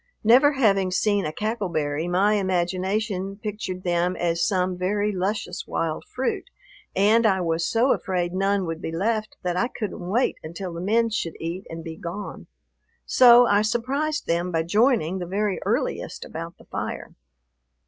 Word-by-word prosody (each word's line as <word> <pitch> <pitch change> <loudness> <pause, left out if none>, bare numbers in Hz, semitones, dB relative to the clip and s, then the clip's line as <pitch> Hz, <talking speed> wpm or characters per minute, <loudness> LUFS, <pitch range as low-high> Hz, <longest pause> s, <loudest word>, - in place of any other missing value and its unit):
Never 260 +7 +6
having 200 -8 +3
seen 200 0 +1
a - - -3
cackle 215 +2 -2
berry, 155 0 -1
my 190 +4 +3
imagination 190 +1 -1
pictured 200 -3 -5
them 175 +1 +1
as 170 -1 0
some 185 -1 +1
very 205 +3 0
luscious 190 -1 -3
wild 160 -1 -2
fruit, 260 +1 -3 0.5
and 215 +4 +4
I 190 -2 +2
was 165 -1 0
so 235 +4 +3
afraid 180 -2 -2
none 195 0 +1
would 165 -1 -4
be - - -4
left 215 +5 -1
that 180 -1 -1
I 235 +6 +1
couldn't 205 -7 -5
wait 235 +6 +1
until 170 +3 -6
the 170 - -5
men 225 +4 +2
should 175 -7 -2
eat 170 +4 -5
and 165 0 -7
be 160 -1 -7
gone. 180 +5 -7 0.6
So 245 -1 +7
I 205 -2 +3
surprised 265 +7 -1
them 170 +2 0
by 165 -1 +1
joining 205 - +2
the 175 - -5
very 200 +1 -1
earliest - - -2
about - - -7
the - - -18
fire. - - -5
190 Hz, 165 wpm, -24 LUFS, 175-215 Hz, 0.6 s, So